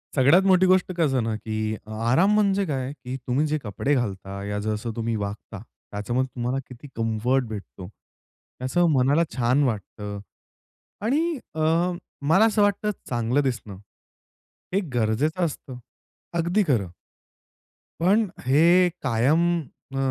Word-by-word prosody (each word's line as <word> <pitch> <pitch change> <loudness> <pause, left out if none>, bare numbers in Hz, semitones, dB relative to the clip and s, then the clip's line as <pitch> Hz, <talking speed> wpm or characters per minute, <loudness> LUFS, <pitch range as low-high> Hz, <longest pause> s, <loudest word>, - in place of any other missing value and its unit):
सगळ्यात 145 +8 +6
मोठी 185 -1 +5
गोष्ट 185 0 +3
कसं 140 -7 +2
ना, 115 -1 -1
की 110 0 -3
अ, 110 - -11 0.2
आराम 185 +12 +4
म्हणजे 200 -2 +2
काय, 135 -4 -2
की 130 -3 -7
तुम्ही 130 +5 +1
जे 155 +1 0
कपडे 110 +7 -1
घालता 100 -5 -3
या 105 0 -3
जसं 110 +2 -3
तुम्ही 115 0 -1
वागता, 105 0 -5 0.3
त्याच्यामध्ये 120 +6 -1
तुम्हाला 125 +2 -1
किती 125 +3 -12
कम्फर्ट 115 +4 +1
भेटतो, 100 -3 -8
त्याचं 130 - -4
मनाला 140 +4 +3
छान 125 +3 +2
वाटतं 105 -3 -3 0.9
आणि 315 +7 +1 0.2
अ, 155 - -2 0.7
मला 190 +8 +5
असं 215 -2 +2
वाटतं, 205 +1 +2 0.2
चांगलं 120 +3 +1
दिसणं 115 -7 -3 1.0
हे 195 - +3
गरजेचं 125 +10 +1
असतं 135 -5 -6 0.6
अगदी 175 +5 +2
खरं. 105 - +1 1.1
पण 200 +5 +3 0.2
हे 170 +7 +5
कायम 130 +5 +2 0.5
अ, - - -3
130 Hz, 130 wpm, -24 LUFS, 110-170 Hz, 1.1 s, सगळ्यात